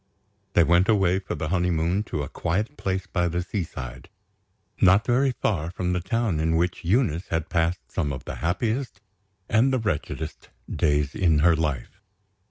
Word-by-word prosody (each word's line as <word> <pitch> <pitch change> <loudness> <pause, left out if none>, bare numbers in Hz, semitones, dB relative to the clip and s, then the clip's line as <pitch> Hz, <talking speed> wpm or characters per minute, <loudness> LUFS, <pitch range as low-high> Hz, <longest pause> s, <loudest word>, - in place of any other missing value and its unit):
They 85 - +5
went 85 +4 +3
away 95 -4 +3
for 95 - -5
their 75 - -3
honeymoon 90 +1 +1
to 75 - -3
a - - -4
quiet 105 - -2
place 95 -5 -2
by 90 -2 0
the 90 +1 -1
seaside, 70 - -6 0.7
not 95 +4 +5
very 130 +2 +3
far 85 -6 0
from 90 0 -2
the 90 - 0
town 100 -1 -1
in 80 +1 +1
which 85 +2 0
Eunice 90 - +1
had 80 -1 -2
passed 85 0 -1
some 75 -6 -1
of 65 - -6
the - - -6
happiest 110 +7 -1 0.5
and 115 +5 +3
the 130 - +2
wretchedest 80 -7 -4 0.3
days 75 -2 +1
in 85 -5 +3
her 85 -1 +6
life. 75 -6 -3
90 Hz, 170 wpm, -25 LUFS, 80-100 Hz, 0.7 s, her